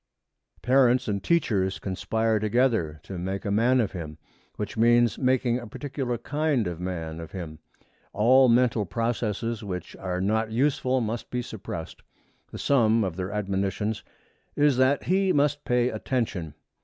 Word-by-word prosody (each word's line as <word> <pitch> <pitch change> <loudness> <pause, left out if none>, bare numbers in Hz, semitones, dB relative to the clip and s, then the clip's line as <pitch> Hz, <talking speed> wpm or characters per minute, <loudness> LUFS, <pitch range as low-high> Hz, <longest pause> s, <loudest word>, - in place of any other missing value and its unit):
Parents 125 -1 +4
and 100 -2 -2
teachers 100 - +1
conspire 110 +3 -1
together 110 - +1
to 95 -3 -7
make 95 +2 -4
a 100 - -1
man 120 +5 +3
of 110 -6 0
him, 80 -4 -7 0.4
which 105 -1 -5
means 120 0 +3
making 125 -2 +2
a 120 - -9
particular 130 0 -4
kind 145 -1 0
of 85 -2 -4
man 85 -3 -4
of 80 -1 -9
him. 80 -5 -7 0.5
All 125 +5 +5
mental 115 -4 +3
processes 115 0 -2
which 90 -3 -6
are 90 -1 -3
not 110 +4 0
useful 130 +1 +1
must 115 +1 -4
be 125 0 -2
suppressed. 95 -8 -7 0.5
The - - -7
sum 115 -5 +3
of 95 -4 -3
their 95 +1 -4
admonitions 100 +1 -2 0.5
is 145 -3 +3
that 130 +2 +3
he 190 +1 +2
must 145 -1 +1
pay 125 0 +2
attention. 105 - -3
110 Hz, 150 wpm, -26 LUFS, 95-125 Hz, 0.5 s, All